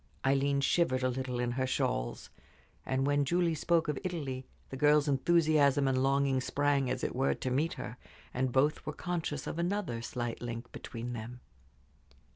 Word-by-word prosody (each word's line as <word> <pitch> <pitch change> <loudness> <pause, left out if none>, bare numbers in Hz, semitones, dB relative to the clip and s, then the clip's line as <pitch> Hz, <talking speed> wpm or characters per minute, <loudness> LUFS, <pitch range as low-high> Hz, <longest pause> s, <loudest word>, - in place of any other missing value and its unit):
Aileen 140 +1 +2
shivered 135 -3 +2
a 130 - +3
little 125 -1 -3
in 120 0 0
her 130 +1 -1
shawls, - - -2 0.6
and 130 +1 +1
when 145 0 +2
Julie 170 +3 +1
spoke 165 +2 +1
of 150 -2 -1
Italy 140 -8 -4 0.2
the - - -4
girl's 150 +2 +4
enthusiasm 145 -1 +3
and 130 -1 +2
longing 135 -1 +2
sprang, 140 0 +1
as 130 0 -2
it - - -2
were, 135 +2 +2
to 130 - -3
meet 150 +6 +1
her, 125 - -7 0.4
and 130 0 0
both 140 +4 +2
were 150 - -4
conscious 165 -5 -3
of 165 - -4
another 175 - -1
slight 120 0 -4
link 120 0 -5
between 120 +1 -6
them. 120 +2 -7
135 Hz, 170 wpm, -31 LUFS, 130-150 Hz, 0.6 s, girl's